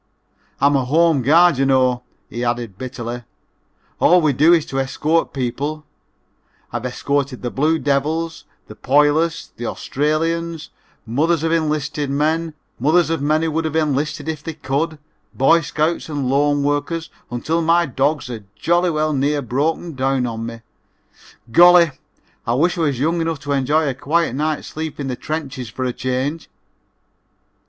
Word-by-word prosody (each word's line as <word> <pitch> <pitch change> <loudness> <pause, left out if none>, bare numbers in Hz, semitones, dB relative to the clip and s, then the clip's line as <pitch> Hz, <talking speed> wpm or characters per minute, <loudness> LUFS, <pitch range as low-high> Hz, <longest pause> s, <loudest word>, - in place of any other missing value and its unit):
"I'm 140 +1 +4
a 135 - +2
home 160 +1 +3
guard, 165 +2 +5
you 135 - +3
know," 130 -2 +2 0.3
he 120 - -5
added 120 -4 -2
bitterly, 120 -2 -5 0.8
"all 180 - +5
we 155 -4 +2
do 150 +6 +5
is 165 -3 +4
to 135 - -3
escort 155 +5 0
people. 145 +4 -3 0.9
I've 120 +1 -2
escorted 140 0 -2
the 120 - -2
Blue 155 +4 +1
Devils, 155 +3 -1 0.2
the - - -11
Poilus, 150 +7 +1
the 120 - -4
Australians, 165 +3 -2 0.3
mothers 155 +8 +1
of 165 - +1
enlisted 150 -3 -1
men, 155 +3 0 0.2
mothers 160 +6 +3
of 165 - -1
men 155 +2 +1
who 165 - 0
would 160 +1 -1
have 160 0 -3
enlisted 150 -1 -1
if 155 -2 -3
they 165 -2 -5
could, 155 +2 -2 0.4
Boy 165 +6 +4
Scouts 160 +2 -1
and 145 -4 -2
loan 145 +2 +2
workers 145 +3 -2 0.2
until 155 +8 -1
my 170 +1 +3
dogs 140 +1 0
are 110 -3 -7
jolly 175 - +2
well 155 -1 0
near 145 +1 0
broken 155 +7 -1
down 130 -1 0
on 115 -1 -4
me. 115 0 -8 0.9
Golly, 175 +3 +7 0.6
I 115 - +1
wish 170 +6 +2
I 170 - -2
was 140 -6 0
young 165 +4 +1
enough 165 -1 -1
to 145 +1 -4
enjoy 145 +3 +2
a 135 - 0
quiet 155 +3 0
night's 155 +2 -2
sleep 155 -1 -6
in 140 -2 -3
the 125 - -2
trenches 135 -4 -5
for 130 +3 -4
a 125 - -1
change." 130 +6 -3
150 Hz, 160 wpm, -20 LUFS, 130-160 Hz, 0.9 s, Golly